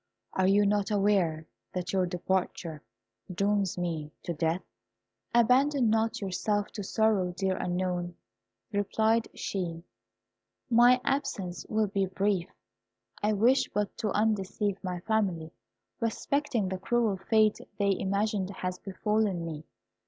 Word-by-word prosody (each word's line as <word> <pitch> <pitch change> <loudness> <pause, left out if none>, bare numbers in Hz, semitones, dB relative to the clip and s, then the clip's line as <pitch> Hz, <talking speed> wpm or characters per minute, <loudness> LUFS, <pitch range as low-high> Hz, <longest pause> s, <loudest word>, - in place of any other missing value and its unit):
Are 190 0 +2
you 205 +1 +4
not 205 +1 +1
aware 195 -6 +2 0.3
that 180 -1 -3
your 185 -2 +2
departure 175 -3 -2 0.5
dooms 200 0 +1
me 165 -4 -3
to 170 - -3
death?" 165 +3 0 0.7
"Abandon 250 +1 +4
not 225 0 +1
yourself 205 +2 -1
to 205 - -5
sorrow, 205 -3 +2
dear 190 -1 +1
Unknown," 175 -1 -2 0.6
replied 220 +2 +1
she, 170 -4 -3 0.9
"my 240 +2 +6
absence 240 -10 -2
will 215 0 +2
be 195 -1 0
brief. 190 -1 0 0.7
I 210 +1 +2
wish 235 +6 +3
but 205 -1 -1
to 220 - 0
undeceive 205 -1 0
my 180 -2 -3
family 185 -7 0 0.5
respecting 230 -2 0
the 190 0 -3
cruel 225 -1 +1
fate 215 +2 +3 0.2
they 200 -1 +2
imagine 200 0 0
has 185 -2 -4
befallen 200 -2 -1
me. 155 -2 -6
200 Hz, 125 wpm, -29 LUFS, 180-220 Hz, 0.9 s, my